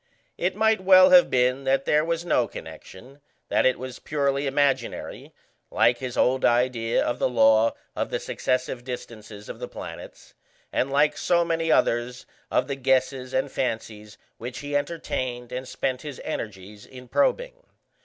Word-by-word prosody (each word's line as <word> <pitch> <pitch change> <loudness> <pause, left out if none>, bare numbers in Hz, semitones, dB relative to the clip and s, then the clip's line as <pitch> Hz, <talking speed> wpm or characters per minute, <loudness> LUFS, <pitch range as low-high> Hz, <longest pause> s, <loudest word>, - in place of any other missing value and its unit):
It 185 +2 -1
might 220 -1 +2
well 185 0 +7
have 180 -1 +7
been 130 +1 +1
that 135 +1 +1
there 150 0 +3
was 170 +1 -2
no 175 - +2
connection, 130 +9 -12 0.3
that - - +3
it 130 - +1
was 130 0 -8
purely 140 -1 -1
imaginary, 140 0 -1 0.4
like 120 - +2
his 130 -2 -5
old 130 +1 +2
idea 120 -1 +2
of 120 - -2
the - - +1
law 110 -1 +4 0.2
of - - -2
the - - -2
successive 130 -1 -2
distances 110 -4 -8
of - - -8
the - - -5
planets, - - -10 0.4
and 130 - 0
like 145 +2 +2
so 170 -1 +2
many 165 -1 0
others 125 -3 +1 0.2
of 125 - +1
the 140 - -3
guesses 130 -1 0
and 130 - -1
fancies 110 -4 -4 0.2
which 120 +2 -6
he 145 0 -3
entertained 130 -5 -3
and 130 +1 -5
spent 130 0 -3
his 145 -4 -8
energies 105 -7 -6
in 125 -1 -12
probing. - - 0
130 Hz, 160 wpm, -25 LUFS, 120-150 Hz, 0.4 s, well